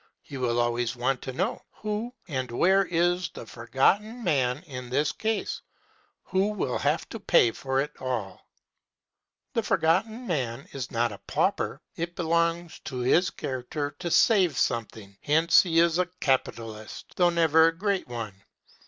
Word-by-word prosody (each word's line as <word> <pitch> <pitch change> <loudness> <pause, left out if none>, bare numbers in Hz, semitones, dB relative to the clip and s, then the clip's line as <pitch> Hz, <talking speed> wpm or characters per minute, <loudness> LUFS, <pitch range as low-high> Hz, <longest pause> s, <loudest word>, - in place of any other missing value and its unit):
He 140 - -10
will 120 -2 0
always 120 0 0
want 125 +1 0
to 130 - -5
know, 130 - -2
Who 215 +3 -4 0.2
and 130 -6 -3
where 190 +11 +3
is 175 0 +1
the - - -9
Forgotten 180 - 0
Man 130 - +1
in 125 -6 -8
this 145 +4 +1
case, 220 0 -2 0.6
who 190 +2 +1
will 155 -11 -2
have - - 0
to - - -6
pay 115 - +4
for 135 +3 -2
it 145 +2 -1
all? 115 -8 -4 1.0
The - - +1
Forgotten 215 +9 +1
Man 135 - -2
is 135 -3 -5
not 120 0 0
a 100 - -9
pauper. - - 0
It 170 +1 -4
belongs 170 0 0
to 130 - -5
his 170 +8 +3
character 140 +3 -4
to 175 -2 -3
save 185 - +4
something. 105 -4 -2
Hence 160 +3 +5
he 165 -3 -1
is 170 +1 +4
a 180 -1 +1
capitalist, 115 -5 -2
though 175 -1 +4
never 160 -1 +5
a 165 0 -1
great 200 0 -1
one. 115 -4 -5
145 Hz, 155 wpm, -27 LUFS, 125-175 Hz, 1.0 s, Hence